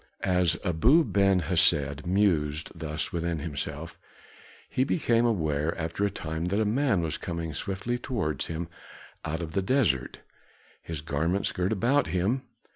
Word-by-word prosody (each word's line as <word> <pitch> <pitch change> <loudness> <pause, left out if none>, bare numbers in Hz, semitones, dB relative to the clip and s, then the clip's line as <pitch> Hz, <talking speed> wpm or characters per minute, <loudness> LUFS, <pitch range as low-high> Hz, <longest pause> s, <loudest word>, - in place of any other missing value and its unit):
As 90 -2 +2
Abu 115 - +5
Ben 100 - +3
Hesed 75 -3 +2
mused 80 -6 +1
thus 80 +1 -4
within 85 -1 -1
himself, 75 +1 -5 0.7
he 130 - +1
became 120 -5 +2
aware 80 -7 0
after 85 +4 -2
a 100 - +3
time 80 -2 -4
that 100 +4 0
a 110 - +2
man 110 -3 +2
was 80 -1 -2
coming 85 -2 -4
swiftly 100 - -2
towards 105 - -2
him 80 +1 -4 0.6
out 80 +3 -3
of 80 - -5
the 95 - 0
desert, 95 - +1 0.6
his 80 -3 -6
garments 80 +6 0
girt 90 +2 -1
about 120 +7 +2
him. 100 +9 0
85 Hz, 145 wpm, -28 LUFS, 80-100 Hz, 0.7 s, Abu